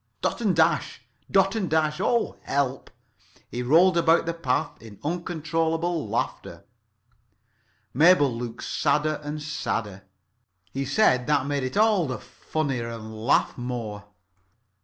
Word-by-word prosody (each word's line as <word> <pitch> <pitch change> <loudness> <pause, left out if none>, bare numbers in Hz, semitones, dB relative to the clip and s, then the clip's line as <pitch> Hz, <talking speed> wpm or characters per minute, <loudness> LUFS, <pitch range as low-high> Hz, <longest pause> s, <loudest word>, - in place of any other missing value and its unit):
Dot - - -1
and 200 -6 +2
Dash! 160 -4 +1 0.3
Dot 195 0 +3
and 200 -5 -1
Dash! 155 -1 +1
Oh, 235 -1 +1
help!" 135 -1 -2 0.6
He 125 - -3
rolled 170 +8 +4
about 165 0 +4
the 170 - -1
path 145 -1 -2
in 110 -3 -12
uncontrollable 165 0 -1
laughter. - - -4 1.3
Mabel 145 -3 +5
looked 120 0 -6
sadder 150 +1 0
and 150 +1 -4
sadder. 110 -9 -4 0.7
He 135 +1 -3
said 130 - +3
that 145 -3 +2
made 145 0 -1
it 130 +7 -3
all 210 -6 +3
the 130 -2 -3
funnier, 135 -2 -4
and 110 -1 -8
laughed 110 +2 +1
more. 115 -5 -5
150 Hz, 130 wpm, -25 LUFS, 125-165 Hz, 1.3 s, Mabel